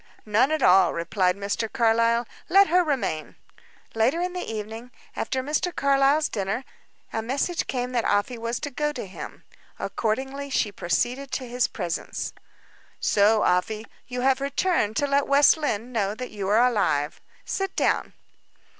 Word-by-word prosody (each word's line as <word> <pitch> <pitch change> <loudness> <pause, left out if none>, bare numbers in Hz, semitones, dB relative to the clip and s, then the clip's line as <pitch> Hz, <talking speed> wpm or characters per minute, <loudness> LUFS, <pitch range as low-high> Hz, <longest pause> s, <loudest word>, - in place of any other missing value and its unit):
"None 220 +5 +3
at 310 -3 0
all," 190 +2 +6
replied 180 +2 0
Mr. 205 +3 -2
Carlyle. 230 +1 +2 0.2
"Let 395 -1 +6
her 360 +2 +4
remain." 260 - -2 0.6
Later 235 +9 +2
in 360 +1 -2
the 360 - -3
evening, 220 +3 -6 0.3
after 260 -2 -2
Mr. 305 +5 -1
Carlyle's 280 +2 +3
dinner, 200 +4 -2 0.5
a 225 - -1
message 275 +9 -1
came 250 -1 -2
that 240 -2 0
Afy 230 +4 0
was 230 +1 -2
to 290 -1 -4
go 295 +3 -1
to 245 - -5
him. 190 - -9 0.3
Accordingly 265 +5 -2
she 220 -5 0
proceeded 240 +10 -1
to 255 - -3
his 245 -3 0
presence. 175 -2 -4 0.7
"So, 210 +1 +3
Afy, 210 +5 +1 0.2
you 250 0 -4
have 265 +1 +2
returned 280 - 0
to 285 - +1
let 280 0 +1
West 280 +1 +6
Lynne 250 -7 -2
know 205 -3 -1
that 250 +2 -6
you 200 -2 -4
are 225 +4 +5
alive. 150 -11 0 0.2
Sit 390 0 -3
down." - - +1
245 Hz, 155 wpm, -25 LUFS, 210-280 Hz, 0.7 s, all